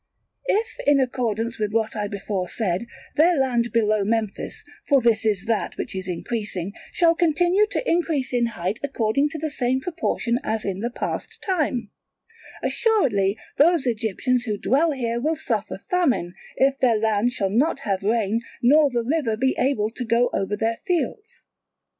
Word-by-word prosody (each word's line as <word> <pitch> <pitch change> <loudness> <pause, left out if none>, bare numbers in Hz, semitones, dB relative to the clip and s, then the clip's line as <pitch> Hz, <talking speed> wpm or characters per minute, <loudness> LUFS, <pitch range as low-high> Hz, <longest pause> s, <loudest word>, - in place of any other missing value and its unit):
If, 455 +1 0
in 285 -1 +5
accordance 235 -3 -1
with 210 -1 -1
what 220 -1 0
I 210 -1 -1
before 200 -2 -3
said, 200 0 -2 0.3
their 335 +2 +5
land 240 -3 +1
below 215 -2 +2
Memphis 215 0 -2 0.2
(for 280 -2 +5
this 230 -3 +2
is 205 -2 0
that 225 -2 -1
which - - -5
is 190 0 -4
increasing) 195 0 -4 0.2
shall 335 -1 +4
continue 350 +5 +3
to - - -3
increase 315 -7 0
in 240 -1 +2
height 185 +5 -2
according 275 +1 +1
to 320 - -6
the 310 0 -3
same 255 0 0
proportion 265 -6 -1
as 220 0 -2
in 195 -1 -2
the 235 +3 -1
past 245 - -5
time, 275 - -1 0.7
assuredly 230 - +2 0.2
those 325 -1 +4
Egyptians 240 +2 0
who 210 -3 -2
dwell 290 +10 +2
here 235 -4 -2
will 315 +4 +1
suffer 220 -10 -2
famine, 270 - +1 0.2
if 270 +1 +3
their 240 -4 +3
land 220 +2 +1
shall 195 -6 -1
not 275 +6 +1
have 195 -3 -1
rain 220 +1 +1 0.2
nor 290 +4 +6
the 240 -2 -1
river 255 -4 0
be 265 +3 +1
able 225 -5 +1
to 250 - -5
go 235 +1 +2
over 195 +2 -1
their 225 +1 0
fields. 390 +4 -2
235 Hz, 165 wpm, -23 LUFS, 215-285 Hz, 0.7 s, nor